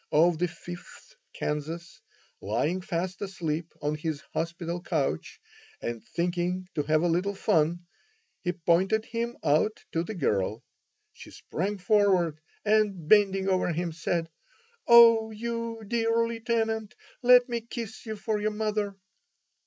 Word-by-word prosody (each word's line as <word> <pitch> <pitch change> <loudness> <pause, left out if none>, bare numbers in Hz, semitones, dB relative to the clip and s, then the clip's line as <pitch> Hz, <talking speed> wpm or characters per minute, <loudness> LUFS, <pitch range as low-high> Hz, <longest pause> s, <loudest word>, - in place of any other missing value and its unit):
of 160 +1 +4
the 180 - +2
Fifth 175 +1 -11 0.2
Kansas, 160 +3 -4 0.4
lying 130 - 0
fast 180 +1 -3
asleep 170 -4 -3
on 150 +1 0
his 150 -1 -3
hospital 170 +1 -3
couch, 145 - -2 0.4
and 120 -1 -4
thinking 180 +1 -2
to 150 - 0
have 155 +2 +2
a - - +3
little 180 +4 0
fun, 175 -3 +1 0.6
he 180 - 0
pointed 185 +5 +2
him 235 +1 -3
out 155 +8 +1
to 165 - 0
the 210 +6 -5
girl. 105 - 0 0.5
She - - -12
sprang 200 +5 -3
forward 185 -5 +2 0.3
and, 205 -6 +2
bending 195 -1 +4
over 185 -2 +2
him, 170 +1 -2
said: 165 0 -2 0.6
"Oh, 230 -2 +8
you 230 0 -4
dear 230 0 +2
Lieutenant, 225 -2 -1 0.3
let 250 0 +7
me 235 -2 -2
kiss 230 -1 -7
you 220 - -3
for 210 +1 -2
your 215 - +1
mother." 210 -1 -2
185 Hz, 135 wpm, -28 LUFS, 165-220 Hz, 0.6 s, Oh